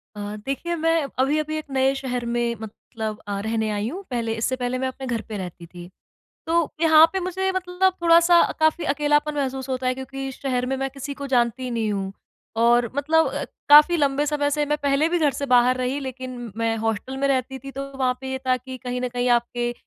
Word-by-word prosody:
अ, - - -8 0.3
देखिए 310 +6 -2
मैं 330 0 +1 0.3
अभी-अभी 305 +3 +1
एक 310 - -5
नए 265 0 +2
शहर 250 -3 -3
में 235 0 -1
मतलब 220 0 -6
अ, 200 -1 -2
रहने 220 -1 0
आई 205 +1 -2
हूँ, 370 +8 -7
पहले 230 -2 -1
इससे 225 +3 -1
पहले 250 0 -2
मैं 260 - 0
अपने 260 0 -6
घर 235 -3 -1
पे 215 - -4
रहती 180 -2 -7
थी। 175 +1 -11 0.6
तो 330 -1 +2
यहाँ 320 -1 +7
पे 380 - -1
मुझे 375 +1 -1
मतलब 375 0 +1
थोड़ा-सा 340 +1 +6
अ, - - +2
काफ़ी 315 +2 +2
अकेलापन 295 +1 +1
महसूस 265 -2 -3
होता 260 -1 -2
है 255 - +2
क्योंकि 270 +1 -6
शहर 250 -2 -2
में 265 +1 -1
मैं 270 0 -2
किसी 280 +1 -6
को 280 - -3
जानती 245 +1 +1
नहीं 225 -3 -1
हूँ 195 -1 -3 0.5
और 240 -1 +4
मतलब 315 +3 +3
अ, - - -3 0.2
काफ़ी 300 +4 +8
लम्बे 285 -1 +1
समय 290 -1 0
से 295 0 0
मैं 295 +1 0
पहले 285 +2 +2
भी 350 +1 +1
घर 305 -3 +3
से 280 +2 -4
बाहर 250 0 +4
रही, 255 +2 -1
लेकिन 255 -3 -7
मैं 225 0 0
हॉस्टल 225 +4 -2
में 275 +1 0
रहती 265 0 -1
थी 275 +1 -9
तो 275 +1 -6
वहाँ 255 -1 +1
पे 265 0 -6
ये 265 - -2
था 255 0 +3
कि 260 +1 -9
कहीं 250 0 -3
न 250 - -1
कहीं 245 0 -1
आपके 240 0 -3
265 Hz, 220 wpm, -23 LUFS, 240-295 Hz, 0.6 s, काफ़ी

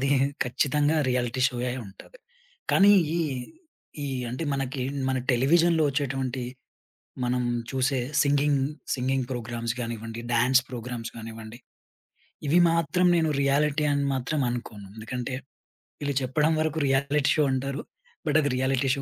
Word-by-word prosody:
అది 135 +1 +1 0.3
ఖచ్చితంగా 145 +5 +1
reality 125 0 0
show 125 - -7
అయుంటది. 120 - -9 0.5
కానీ 200 +1 +7 0.3
ఈ, - - +1 0.8
ఈ - - -2 0.2
అంటే 130 +6 -3
మనకి 135 -1 -2 0.3
మన 130 -1 +1
టెలివిజన్‌లో 160 +5 +4
వచ్చేటువంటి, 135 -2 -2 0.8
మనం 125 0 0 0.3
చూసే 135 0 +1 0.2
సింగింగ్, 145 -1 +2 0.3
సింగింగ్ 130 0 0
ప్రోగ్రామ్స్ 115 -1 -3
గానివ్వండి, 115 0 -5
డాన్స్ 125 +3 +4
ప్రోగ్రామ్స్ 120 -1 -5
కానివ్వండి, 110 0 -9 0.9
ఇవి 175 +4 +5
మాత్రం 170 +2 +2
నేను 160 -1 +2
రియాలిటీ 150 +2 +2
అని 140 0 +1
మాత్రం 135 +4 -2
అనుకోను. 110 -5 -6
ఎందుకంటే 125 +3 -4 0.7
వీళ్ళు 145 -2 -1
చెప్పడం 150 +5 +2
వరకు 155 0 -1
రియాలిటీ 140 +2 +2
షో 150 - +4
అంటారు. 135 +2 -2 0.5
బట్ 150 +1 +3
అది 145 - 0
రియాలిటీ 130 +1 +1
షో 140 - -4
135 Hz, 125 wpm, -26 LUFS, 125-145 Hz, 0.9 s, కానీ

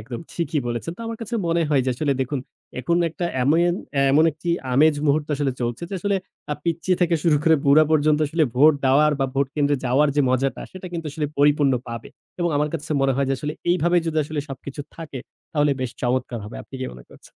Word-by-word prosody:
একদম 120 +2 -7
ঠিকই 160 -3 -1
বলেছেন। 120 +7 -3
তো - - -12
আমার 230 -1 -5
কাছে 230 +1 -5
মনে 170 0 +2
হয় 140 -3 +3
যে 130 - +1
আসলে 140 +2 0
দেখুন 130 +1 -1 0.4
এখন 170 +7 +1
একটা 165 +2 -5 0.2
এমেন 170 +5 +3 0.4
এমন 150 +4 +5
একটি 160 +4 -8 0.3
আমেজ 155 +3 +5
মুহূর্ত 145 +1 +2
আসলে 140 -2 0
চলছে 120 +2 -2
যে - - -3
আসলে 200 +1 +1 0.4
আ - - -1
পিচ্চি 170 +2 0
থেকে 175 -1 +3
শুরু 160 -3 +4
করে 160 -1 +5
বুড়া 145 +2 +6
পর্যন্ত 155 -1 +3
আসলে 160 +1 +2
ভোট 150 +4 +7
দেওয়ার 150 +3 +4
বা 135 - +2
ভোট 140 0 +2
কেন্দ্রে 145 -1 +2
যাওয়ার 135 +5 +3
যে 145 - +5
মজাটা 130 +1 0
সেটা 185 0 -8
কিন্তু 165 -2 -4
আসলে 150 +1 -2
পরিপূর্ণ 145 -1 +4 0.2
পাবে 115 -1 -6 0.3
এবং 175 - +2
আমার 150 +1 +1
কাছে 155 -2 -5
মনে 135 -1 +3
হয় 140 0 +1
যে 135 - +2
আসলে 150 +2 -3 0.2
এইভাবে 175 0 +2
যদি 160 - -2
আসলে 150 0 -3
সবকিছু 135 +2 -7 0.2
থাকে 155 -5 -7 0.3
তাহলে 145 -2 +3
বেশ 130 -2 -2
চমৎকার 125 -1 -1
হবে। 105 - -8
আপনি - - -15
কি 130 - -2
মনে 60 -1 -13
করছে? - - -17
150 Hz, 220 wpm, -23 LUFS, 135-165 Hz, 0.4 s, ভোট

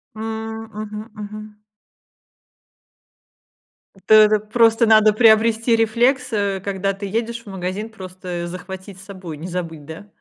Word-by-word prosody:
М, 220 0 -5
мгм, 215 +1 -7
мгм. 210 0 -9 2.5
То - - +5
это 215 0 +7
просто 225 +2 +3
надо 215 -1 +6
приобрести 225 +1 +4
рефлекс, 245 +4 +1
э, 200 -2 0
когда 195 0 -1
ты 200 +1 -7
едешь 230 +3 -3
в - - -22
магазин, 190 +3 -4
просто 185 -4 -7
захватить 190 +2 -9
с 195 - -12
собой, 185 -6 -8
не 160 +4 -7
забыть, 165 -4 -5
да. 160 +6 -10
210 Hz, 130 wpm, -20 LUFS, 190-225 Hz, 2.5 s, это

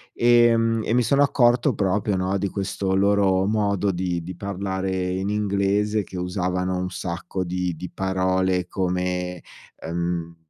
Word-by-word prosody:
ehm, 115 -1 +4
e - - -2
mi 125 - +3
sono 140 +5 +2
accorto 125 -2 +3
proprio, 100 +1 0
no, 95 +1 -1
di 100 0 -1
questo 95 0 -2
loro 95 -1 +3
modo 100 -2 +1
di 90 -2 -2
di 90 +1 -7
parlare 95 0 -3 0.2
in 95 +2 -2
inglese 105 0 +1
che 95 - -9
usavano 90 0 -1
un 90 0 -2
sacco 90 +1 -4
di 90 0 -2
di 90 +3 -8
parole 95 -1 0
come, 90 -1 -2 0.4
ehm: 85 0 -3
95 Hz, 145 wpm, -23 LUFS, 90-100 Hz, 0.4 s, ehm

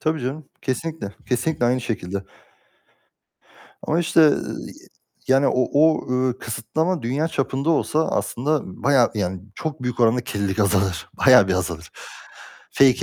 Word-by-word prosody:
Tabii 155 -1 -1
canım, 135 +4 -5
kesinlikle, 155 -2 -3 0.2
kesinlikle 130 +2 0
aynı 125 +2 +2
şekilde. 100 -4 -4 1.6
Ama 160 - 0
işte, 170 0 +3
ııı, 155 -2 +3 0.7
yani 135 +1 +4
o - - +2 0.2
o 155 +2 +3
ııı, 125 0 0
kısıtlama 140 - -2
dünya 135 +7 -1
çapında 135 0 -1
olsa 160 0 +1
aslında 145 +4 -1 0.2
bayağı, 135 -4 +4
yani 95 -3 -2
çok 155 -3 -5
büyük 125 -1 -3
oranda 120 +1 +4
kirlilik 100 -3 -3
azalır, 95 -4 +1 0.2
bayağı 125 -7 +7
bir - - +2
azalır. 85 -3 -3 0.8
Fake 130 -2 +4
130 Hz, 135 wpm, -22 LUFS, 105-155 Hz, 1.6 s, bayağı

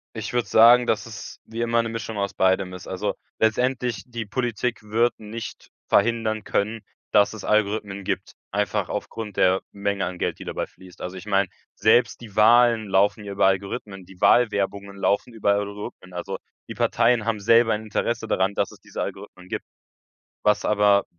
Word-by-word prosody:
Ich 110 +3 -5
würde 120 -1 +1
sagen, 120 +2 +7
dass 105 -3 +1
es 115 -3 -9
wie 115 +1 -6
immer 115 0 +2
'ne 115 - -3
Mischung 115 -1 -5
aus 100 -1 -1
beidem 95 0 +1
ist. 90 0 -9
Also, 95 - -2 0.3
letztendlich, 120 -2 +1
die 120 -2 -5
Politik 120 +1 -2
wird 115 +3 +1
nicht 110 +2 -8 0.2
verhindern 110 0 +2
können, 110 +2 -1 0.3
dass 100 -1 +5
es 110 - -8
Algorithmen 105 -2 0
gibt, - - -3 0.2
einfach 105 -1 -1
aufgrund 105 0 -5
der 95 +1 +4
Menge 100 -1 -1
an 90 0 -5
Geld, - - -2
die - - -7
dabei - - -3
fließt. 90 -1 -17
Also 90 +1 -5
ich 95 - -9
meine, 100 -1 +2 0.3
selbst 120 +3 +3
die 105 -4 -11
Wahlen 115 0 +5
laufen 100 +3 +2
ja 100 - -5
über 100 - +3
Algorithmen, 95 0 -2
die 95 0 -16
Wahlwerbungen 100 -4 +2
laufen 100 +4 0
über 105 -2 +2
Algorithmen. 100 -2 -5
Also, 90 - -4 0.3
die - - -7
Parteien 120 -1 +2
haben 115 -2 0
selber 115 +2 +4
ein 110 +1 -3
Interesse 115 +1 -2
daran, 95 -1 +1
dass - - -1
es - - -15
diese - - -6
Algorithmen 95 -2 -7
gibt. - - -4 0.8
Was 105 -1 +3
aber 105 -1 +4
105 Hz, 180 wpm, -24 LUFS, 100-115 Hz, 0.8 s, sagen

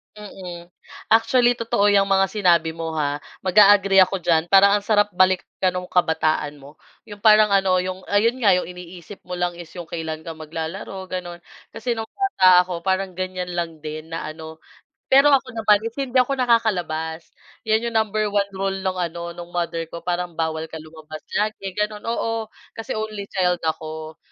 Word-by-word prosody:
Mm. 180 -4 -10 0.4
Actually 240 +2 +4
totoo 215 -3 +1
yang 200 -1 +4
mga 195 -1 +2
sinabi 175 -6 +2
mo 165 0 -5
ha. 145 -2 -1 0.2
Mag-a-agree 200 0 +5
ako 190 0 +4
diyan. 165 -2 +2
Parang 200 +3 +5
ang 205 - -8
sarap 210 -2 +3
balikan 185 0 +1
nung 180 0 -5
kabataan 155 -4 +1
mo. 145 +3 -15 0.3
Yung 205 - -9
parang 215 0 +5
ano, 195 -2 +3
yung 185 +1 -6
ayun 225 +5 +2
nga, 220 -7 +4
yung 180 -1 -1
iniisip 180 +1 -11
mo 180 - -7
lang 175 -1 -2
is 170 -2 -11
yung 175 -3 -9
kailan 160 -1 -5
ka 165 0 -8
maglalaro, 165 +4 -6
ganun. 175 -1 -6 0.3
Kasi 240 -2 -3
nung 225 - -3
bata 190 - +5
ako 180 -1 -6
parang 190 -1 -1
ganyan 185 -1 -4
lang 165 -2 -4
din 155 +1 -7
na 165 -2 -4
ano. 160 0 -10 0.4
Pero 275 +2 +5
ako 265 -3 +2
naman 215 -2 +4 0.2
hindi 265 -1 -2
ako 255 +2 +3
nakakalabas, 180 -11 0 0.3
yun 220 +1 0
yung 235 - -5
number 215 -1 +1
1 205 -1 0
rule 195 0 -1
nung 190 -1 -2
ano, 170 -1 -4
nung 175 0 -10
mother 170 -1 -2
ko 170 +1 -9
parang 180 -1 -3
bawal 160 -1 -2
ka 160 -1 -9
lumabas 155 0 -11 0.2
lagi, 205 -2 -3
ganun 210 0 -2
oo, 225 -1 -2 0.2
kasi 225 -1 -5
only 215 -2 -5
child 180 -2 0
ako, 160 0 -5
185 Hz, 175 wpm, -22 LUFS, 165-210 Hz, 0.4 s, Mag-a-agree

